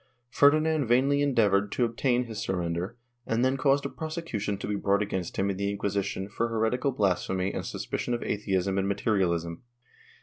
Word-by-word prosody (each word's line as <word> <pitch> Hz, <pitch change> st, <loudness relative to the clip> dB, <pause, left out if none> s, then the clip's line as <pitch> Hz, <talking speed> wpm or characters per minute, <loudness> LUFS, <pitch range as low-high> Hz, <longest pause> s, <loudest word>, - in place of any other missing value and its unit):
Ferdinand 155 Hz, +1 st, +4 dB
vainly 135 Hz, +4 st, +3 dB
endeavored 105 Hz, -8 st, +2 dB
to 125 Hz, -, +2 dB
obtain 120 Hz, +2 st, +1 dB
his 110 Hz, -3 st, -7 dB
surrender 90 Hz, +4 st, -2 dB, 0.3 s
and 115 Hz, +2 st, +1 dB
then 130 Hz, +1 st, +2 dB
caused 140 Hz, +1 st, +2 dB
a -, -, -1 dB
prosecution 155 Hz, -, -4 dB
to -, -, -6 dB
be 105 Hz, -, -1 dB
brought 100 Hz, +1 st, +1 dB
against 95 Hz, -4 st, -4 dB
him 100 Hz, +1 st, +1 dB
in 95 Hz, -, -5 dB
the 100 Hz, 0 st, -1 dB
Inquisition 100 Hz, -1 st, -2 dB
for 115 Hz, +3 st, -1 dB
heretical 115 Hz, +4 st, 0 dB
blasphemy 95 Hz, -3 st, 0 dB
and -, -, -3 dB
suspicion 120 Hz, -, -3 dB
of 120 Hz, -, -4 dB
atheism 95 Hz, -2 st, 0 dB
and 95 Hz, -, 0 dB
materialism. 90 Hz, -5 st, 0 dB
105 Hz, 170 wpm, -28 LUFS, 95-125 Hz, 0.3 s, Ferdinand